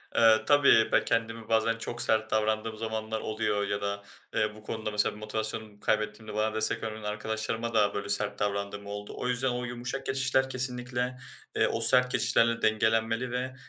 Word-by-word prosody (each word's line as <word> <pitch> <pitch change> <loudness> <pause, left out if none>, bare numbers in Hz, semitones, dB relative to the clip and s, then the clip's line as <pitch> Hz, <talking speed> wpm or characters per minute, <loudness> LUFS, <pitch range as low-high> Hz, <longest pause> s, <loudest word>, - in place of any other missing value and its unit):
Eee, 110 -1 +5
tabii 140 -6 +5
ben - - +3
kendimi 115 -1 -2
bazen 115 0 +2
çok 120 +1 -4
sert 110 0 +1
davrandığım 110 0 0
zamanlar 110 0 -3
oluyor 105 -2 -1
ya 100 0 -2
da, 100 0 -3 0.3
eee, 105 0 0
bu 110 - -14
konuda 110 0 -4
mesela 105 0 +1
motivasyonumu 110 0 -4
kaybettiğimde 105 +1 -2
bana 110 0 0
destek 110 +1 +1
vermeyen 110 -1 -5
arkadaşlarıma 110 +2 -3
da 105 -2 +3
böyle 100 0 -4
sert 105 0 -1
davrandığım 100 0 -3
oldu. 105 0 -7
O - - -3
yüzden 125 +1 0
o 125 0 -3
yumuşak 120 +3 -5
geçişler 130 0 +2
kesinlikle, 125 -1 -2 0.4
eee, - - +3
o 115 - -2
sert 125 +2 +6
geçişlerle 115 -1 +3
dengelenmeli 110 +2 +1
ve, 130 +1 -3
110 Hz, 170 wpm, -28 LUFS, 105-120 Hz, 0.4 s, sert